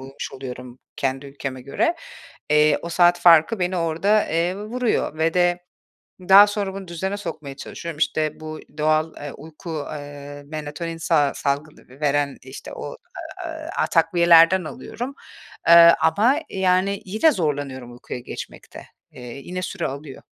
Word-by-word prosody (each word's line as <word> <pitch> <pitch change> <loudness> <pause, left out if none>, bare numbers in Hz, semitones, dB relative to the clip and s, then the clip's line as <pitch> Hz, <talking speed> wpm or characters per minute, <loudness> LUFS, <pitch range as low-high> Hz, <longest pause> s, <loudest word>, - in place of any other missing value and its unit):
uyumuş 135 +1 -8
oluyorum 125 -1 -8 0.2
kendi 135 +1 -2
ülkeme 135 -2 -6
göre. 235 - 0 0.6
Eee, 150 0 +4
o 170 - -6
saat 175 0 +4
farkı 175 +4 +5
beni 180 0 -1
orada, 170 +6 +2
eee, 170 +3 0
vuruyor 220 -6 -2
ve 165 +1 +1
de 175 0 +1 0.5
daha 195 +3 +7
sonra 205 -2 -3
bunu 195 -2 -8
düzene 190 +4 -3
sokmaya 155 -7 -7
çalışıyorum. 165 +2 -8
İşte, 155 0 0
bu 155 0 -7 0.2
doğal, 155 +1 +1
eee, 145 -1 -7
uyku, 155 0 -7
eee, 145 0 -9
melatonin 155 +2 -6
sa 150 -4 +2
salgı 145 +2 -3
ve 130 +3 -17
veren, 145 -1 0
işte 130 +1 -10
o, - - -7 0.5
aaa, 320 +1 -3
takviyelerden 170 +1 +5
alıyorum. 245 - -7 0.5
Eee, 170 - +8 0.3
ama, 215 - +3
yani, 190 +1 +1
yine 220 - +3
zorlanıyorum 140 - -3
uykuya 120 +1 -8
geçmekte. 120 - -9 0.3
Eee, - - -13 0.2
yine 185 +5 -6
süre 185 - -3
alıyor. 140 0 -8
160 Hz, 140 wpm, -22 LUFS, 145-185 Hz, 0.6 s, Eee